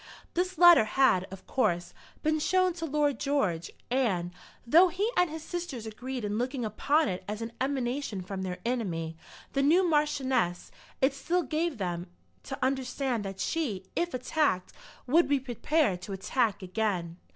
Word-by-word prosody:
This 365 +1 -1
letter 345 -8 +8
had, 215 -6 +3
of 195 0 -10
course, 175 -9 0 0.3
been 310 0 +2
shown 370 +3 +2
to 330 -1 -4
Lord 295 -2 +1
George; 205 - 0 0.2
and, 195 -10 +1 0.3
though 330 +9 +7
he 395 +6 -1
and 360 -1 +3
his 315 0 -6
sisters 340 -10 -5
agreed 245 +2 -5
in 205 +1 -1
looking 250 0 -2
upon 295 +8 +2
it 185 0 -3
as 210 +1 -4
an 230 - -5
emanation 260 -6 -1
from 190 +1 -5
their 180 -1 -3
enemy, 175 -10 -2 0.4
the 275 - +2
new 345 +6 +4
Marchioness, 265 - +1 0.3
it 265 +1 +4
still 345 +6 0
gave 310 +1 -1
them 175 -2 -3 0.3
to 270 - -6
understand 260 -3 -1
that 195 0 -6
she, 230 - -2
if 345 -4 -1
attacked, 255 -7 0 0.3
would 325 +7 +4
be 285 -1 +2
prepared 255 - 0
to 195 +2 -6
attack 205 +1 0
again. 180 -4 -2
260 Hz, 160 wpm, -29 LUFS, 195-305 Hz, 0.4 s, letter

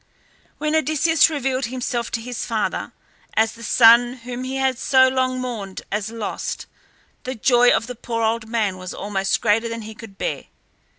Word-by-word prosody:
When 305 +1 -1
Odysseus 315 +1 +3
revealed 270 -4 -1
himself 240 -1 -3
to 230 - -1
his 245 0 -5
father 220 -3 -2 0.4
as 220 0 +3
the 230 - -14
son 235 +2 +6
whom 250 +1 -5
he 260 +1 -4
had 265 -2 0
so 260 -1 +5
long 255 0 0
mourned 220 -7 -5
as 210 +1 -2
lost, 225 -2 -4 0.6
the 255 +1 -5
joy 245 +2 +4
of 225 - +2
the 250 - -6
poor 230 -1 -3
old 220 0 -1
man 210 -5 -1
was 185 0 -7
almost 195 -1 -1
greater 225 +1 +2
than 230 -1 -5
he 220 +1 -8
could 215 -3 -13
bear. - - -3
235 Hz, 175 wpm, -22 LUFS, 220-255 Hz, 0.6 s, son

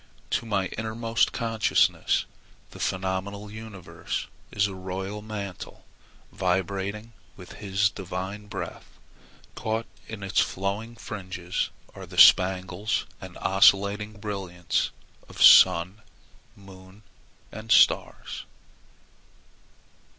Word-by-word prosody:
To 115 - -1
my 100 -3 0
innermost 115 +1 0
consciousness 115 -2 +1 0.5
the - - -12
phenomenal 95 +2 -3
universe 110 -5 -6 0.3
is 100 -1 +2
a 100 - -3
royal 95 +2 -5
mantle, 105 -3 -7 0.5
vibrating 100 +4 -2 0.2
with 90 -2 -12
His 100 0 +2
divine 95 +2 -6
breath. 105 -2 -8 0.6
Caught 110 +1 -2 0.2
in 110 -2 -7
its 95 - 0
flowing 100 +5 -2
fringes 95 -5 -4 0.2
are - - -10
the - - -11
spangles 95 +2 +4 0.2
and - - -10
oscillating 100 +2 +3
brilliants 100 -5 -2 0.4
of - - -12
sun, 90 +3 +7 0.5
moon, 95 +1 -15 0.5
and 110 +1 -8
stars. - - +3
100 Hz, 95 wpm, -26 LUFS, 95-105 Hz, 0.6 s, sun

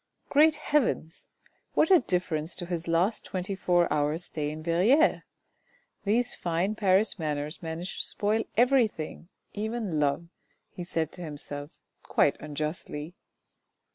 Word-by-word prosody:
Great 305 +2 +6
heavens! 235 - -1 0.5
what 320 - +4
a 365 - +8
difference 180 - -1
to 175 - -4
his 170 -1 -4
last 175 +6 +1
twenty 185 +1 -3
four 175 -2 +2
hours' 150 +3 0
stay 150 -2 -3
in 155 +1 -7
Verrieres. 205 - +4 0.8
These 235 +4 +1
fine 175 +4 -1
Paris 205 +1 +2
manners 150 0 -3
manage 165 +2 -4
to - - +2
spoil 215 +2 +1
everything, 230 - +2 0.2
even 215 -5 -2
love, 145 +3 0 0.4
he 175 - -7
said 165 -3 -2
to 180 - -10
himself, 145 -2 -7 0.2
quite - - +2
unjustly. 150 +1 -4
175 Hz, 130 wpm, -28 LUFS, 155-215 Hz, 0.8 s, a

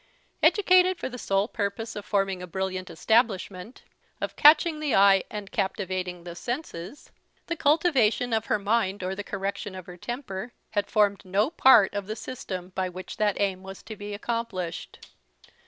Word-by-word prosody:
Educated 370 -2 +5
for - - -4
the 250 -1 -8
sole 195 0 +1
purpose 225 +1 -3
of 205 -1 -6
forming 195 -3 0
a 180 - -7
brilliant 185 +1 -3
establishment, 220 -2 0 0.4
of - - -4
catching 305 +1 +6
the 300 -5 0
eye, 195 -1 +6
and 210 -2 -7
captivating 185 -3 -2
the 175 -1 -7
senses, 240 - -6 0.3
the 340 - -3
cultivation 280 -7 +2
of 220 0 0
her - - +2
mind 205 -2 0
or 185 +1 -2
the 205 +1 -5
correction 195 0 -4
of 185 -2 -8
her 180 -1 -11
temper 240 0 -6 0.2
had 205 -2 0
formed 205 -2 +2
no 200 - +1
part 235 - +6
of 200 -1 -4
the 215 - -4
system 190 -7 -6
by 185 -1 -1
which 185 +1 -8
that 210 -2 +1
aim 195 -2 0
was 190 0 -10
to 220 - -8
be 205 0 -6
accomplished. 210 -6 -4
205 Hz, 170 wpm, -26 LUFS, 190-235 Hz, 0.4 s, catching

